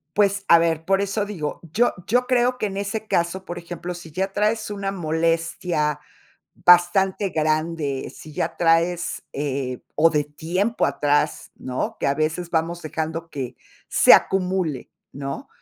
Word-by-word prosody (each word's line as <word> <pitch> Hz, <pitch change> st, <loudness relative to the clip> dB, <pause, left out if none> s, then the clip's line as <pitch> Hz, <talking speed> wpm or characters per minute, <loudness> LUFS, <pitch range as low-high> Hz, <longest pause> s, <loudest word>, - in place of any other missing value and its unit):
Pues, 200 Hz, -1 st, +2 dB
a 170 Hz, -, +8 dB
ver, 165 Hz, -1 st, +1 dB
por 195 Hz, +2 st, +2 dB
eso 200 Hz, +1 st, -1 dB
digo, 165 Hz, -8 st, -5 dB
yo 240 Hz, +7 st, +2 dB
yo 250 Hz, +3 st, +1 dB
creo 250 Hz, 0 st, +2 dB
que 215 Hz, -, -1 dB
en 195 Hz, -1 st, -4 dB
ese 200 Hz, +2 st, -3 dB
caso, 175 Hz, +3 st, 0 dB
por 175 Hz, -, -6 dB
ejemplo, 175 Hz, +1 st, -6 dB
si 170 Hz, -2 st, -10 dB
ya 190 Hz, +4 st, -2 dB
traes 215 Hz, +1 st, 0 dB
una 200 Hz, -1 st, -3 dB
molestia 165 Hz, -2 st, -1 dB, 0.5 s
bastante 185 Hz, +2 st, +4 dB
grande, 155 Hz, -3 st, -1 dB
si 155 Hz, -, -11 dB
ya 165 Hz, +3 st, -2 dB
traes, 170 Hz, +1 st, +1 dB
eh, 135 Hz, -3 st, -3 dB, 0.2 s
o 165 Hz, +2 st, +5 dB
de 150 Hz, -1 st, +2 dB
tiempo 175 Hz, +10 st, -1 dB
atrás, 145 Hz, +1 st, 0 dB
¿no? 130 Hz, 0 st, -4 dB
Que -, -, -1 dB
a 140 Hz, -, +2 dB
veces 160 Hz, +3 st, -2 dB
vamos 170 Hz, +1 st, -1 dB
dejando 160 Hz, +1 st, -4 dB
que 130 Hz, -4 st, -5 dB, 0.3 s
se -, -, +7 dB
acumule, 180 Hz, -7 st, 0 dB, 0.2 s
¿no? 140 Hz, -, -6 dB
170 Hz, 155 wpm, -23 LUFS, 155-195 Hz, 0.5 s, a